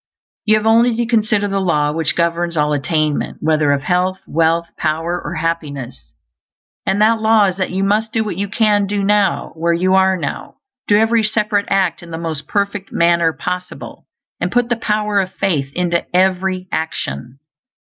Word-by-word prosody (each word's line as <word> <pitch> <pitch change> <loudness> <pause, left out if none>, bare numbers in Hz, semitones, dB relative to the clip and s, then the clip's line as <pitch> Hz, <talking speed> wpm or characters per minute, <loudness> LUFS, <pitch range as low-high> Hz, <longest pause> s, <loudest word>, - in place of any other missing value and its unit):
You 215 0 +4
have 215 0 -1
only 230 +1 +4
to 235 +1 0
consider 215 -3 +1
the 195 0 -1
Law 150 -5 +1
which 160 0 -1
governs 170 0 0
all 150 0 +2
attainment, 150 +1 -1
whether 155 -2 +2
of 140 -1 0
health, 180 +3 0
wealth, 165 +1 +1
power, 165 +3 -2
or - - -5
happiness; 140 - -4 0.8
and 195 - +1
that 225 +1 +3
law 220 -1 +4
is 185 -1 -1
_that 185 - -1
you 190 +1 -2
must 215 +3 +1
do 225 - 0
what 210 -5 -4
you 200 +3 -2
can 205 -1 +2
do 200 0 -1
now, 205 0 +1
where 170 +1 0
you 185 +2 +1
are 190 0 +4
now; 145 -5 -5 0.3
do 205 - +4
every 225 +1 +3
separate 210 -1 0
act 185 -4 +1
in 175 - -12
the 160 - -5
most 160 -3 -5
perfect 200 -1 -2
manner 170 -1 +3
possible, 180 +2 -6 0.3
and - - -2
put 245 -1 +1
the 240 - +2
power 210 -2 0
of 190 -1 -2
faith 150 -9 -1
into 175 -1 0
every 185 0 +1
action_. 155 -5 -4
185 Hz, 180 wpm, -17 LUFS, 165-210 Hz, 0.8 s, You